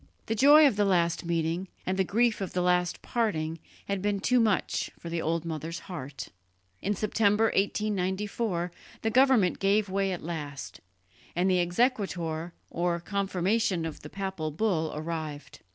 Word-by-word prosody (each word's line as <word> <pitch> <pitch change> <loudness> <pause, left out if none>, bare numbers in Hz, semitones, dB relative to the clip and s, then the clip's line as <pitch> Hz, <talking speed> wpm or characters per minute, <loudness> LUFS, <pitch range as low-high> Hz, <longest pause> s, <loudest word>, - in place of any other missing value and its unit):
The 225 - -1
joy 290 +7 +7
of 265 -8 +3
the 205 - +4
last 175 -3 +2
meeting 170 +2 -1 0.2
and 185 - 0
the 190 - +2
grief 225 +3 +1
of 190 - -4
the 180 - 0
last 180 -1 +1
parting 165 -9 -1 0.3
had 200 -1 -1
been 205 0 0
too 250 +5 +3
much 215 -4 +1
for 170 - -8
the 170 -1 -1
old 165 +1 -1
mother's 165 +1 -4
heart. 145 -7 -7 0.5
In 205 +1 0
September 215 +1 +2
1894 195 -2 -1 0.3
the 225 - +1
government 255 -7 +4
gave 200 +1 +2
way 195 0 0
at 180 - -4
last, 150 -5 -6 0.5
and 180 +2 +2
the 180 - +3
exequatur 175 -5 0 0.2
or 170 0 0
confirmation 195 0 0
of 160 - -5
the 150 - -10
papal 190 -5 -3
bull 160 -2 0
arrived. 155 -2 -5
185 Hz, 155 wpm, -28 LUFS, 165-210 Hz, 0.5 s, joy